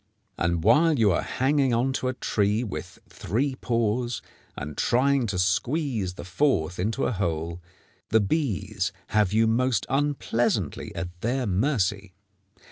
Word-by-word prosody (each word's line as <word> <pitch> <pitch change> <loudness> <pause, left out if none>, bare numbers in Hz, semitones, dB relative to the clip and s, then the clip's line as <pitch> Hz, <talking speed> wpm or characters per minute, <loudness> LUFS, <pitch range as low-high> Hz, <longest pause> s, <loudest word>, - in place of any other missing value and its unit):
And 85 -1 0
while 160 - +5
you 110 -4 +4
are 85 - +1
hanging 135 -1 +1
on 130 +3 +1
to 130 - -2
a 130 - 0
tree 105 +1 0
with 105 - -6
three 130 +9 -2
paws, 120 0 -1 0.3
and 75 +1 -5
trying 130 0 +2
to 100 -3 -2
squeeze 105 - 0
the - - -8
fourth 90 - 0
into 110 +8 0
a - - 0
hole, 85 -4 -2 0.5
the 110 - +4
bees 105 - -1 0.2
have 105 -3 +2
you 110 +2 +3
most 115 -3 +1
unpleasantly 120 - 0
at 90 +1 -6
their 125 +4 0
mercy. 100 -3 0
110 Hz, 140 wpm, -26 LUFS, 90-130 Hz, 0.5 s, while